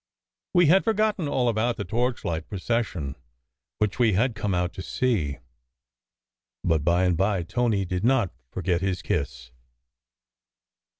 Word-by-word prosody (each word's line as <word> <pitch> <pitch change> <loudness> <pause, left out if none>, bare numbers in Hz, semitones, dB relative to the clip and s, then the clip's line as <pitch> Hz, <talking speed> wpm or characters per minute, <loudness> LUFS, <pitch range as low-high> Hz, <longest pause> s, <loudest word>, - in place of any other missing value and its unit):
We 175 -1 +6
had 180 +6 +5
forgotten 215 -6 +1
all 130 -3 +1
about 115 +1 +1
the 100 - -3
torchlight 115 -9 -2
procession 95 - -2 0.6
which 105 +1 -1
we 115 -4 +4
had 115 +6 +2
come 105 -3 -1
out 90 0 -1
to - - -7
see. 95 - 0 1.3
But 80 -3 +1
by 85 +3 +3
and 90 -2 +3
by 95 0 +1
Tony 110 +1 0
did 90 +1 -3
not 120 -6 +3 0.2
forget 90 +1 -1
his 95 -2 -1
kiss. 70 -4 -3
100 Hz, 135 wpm, -26 LUFS, 90-120 Hz, 1.3 s, We